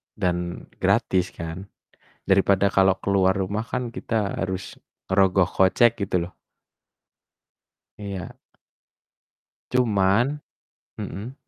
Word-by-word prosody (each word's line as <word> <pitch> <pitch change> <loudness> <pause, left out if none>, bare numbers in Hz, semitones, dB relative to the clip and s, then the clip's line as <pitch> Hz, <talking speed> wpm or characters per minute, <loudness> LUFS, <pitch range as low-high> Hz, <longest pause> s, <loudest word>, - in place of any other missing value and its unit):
dan 85 -1 -2
gratis 90 -1 +2
kan, 85 +4 -6 0.6
daripada 95 0 +4
kalau 95 -1 +4
keluar 95 -1 +2
rumah 100 +3 -1
kan 120 +1 -3
kita 110 -3 -2
harus 95 -2 -4 0.3
ngerogoh 95 -1 +4
kocek, 110 +5 +3
gitu 90 -3 0
loh. - - -22 1.6
Iya. 100 -4 -6 1.4
Cuman 120 +3 +2 0.6
mhm? 105 +8 -6
95 Hz, 90 wpm, -24 LUFS, 95-105 Hz, 1.6 s, daripada